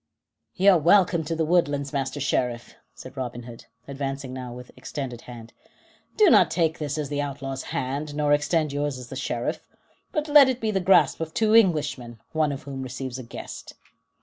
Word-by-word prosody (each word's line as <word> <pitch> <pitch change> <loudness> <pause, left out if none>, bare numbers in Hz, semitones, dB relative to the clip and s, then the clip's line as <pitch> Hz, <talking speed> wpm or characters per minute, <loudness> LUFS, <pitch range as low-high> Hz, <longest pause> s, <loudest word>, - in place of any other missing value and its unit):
"You're 190 -1 +5
welcome 175 0 +4
to 165 +2 -2
the 160 0 0
woodlands, 145 -4 +1
Master 140 +1 -2
Sheriff," 125 -3 -1 0.2
said - - -11
Robin 120 -2 -5
Hood, 115 -1 -11 0.2
advancing 135 -1 -5
now 130 -1 -6
with 125 +1 -10
extended 130 -5 -6
hand. 120 -1 -11 0.6
"Do 420 -6 +6
not - - +6
take 160 -2 0
this 150 -1 -3
as 150 -2 -3
the 145 -1 -1
outlaw's 135 -2 -5
hand, 145 +3 -3
nor 150 -1 +2
extend 150 0 +1
yours 145 -1 -2
as 125 -2 -10
the - - -7
Sheriff; 120 -3 -3 0.4
but 305 0 -2
let 290 -3 +7
it 255 -1 -1
be 220 -2 -1
the 195 - 0
grasp 190 +1 +4
of 160 -1 -5
two 220 -1 +2
Englishmen, 145 - +2
one 155 -2 +1
of 140 - -6
whom 135 -1 -6
receives 130 0 -5
a - - -7
guest." 115 - -9
145 Hz, 185 wpm, -25 LUFS, 130-165 Hz, 0.6 s, let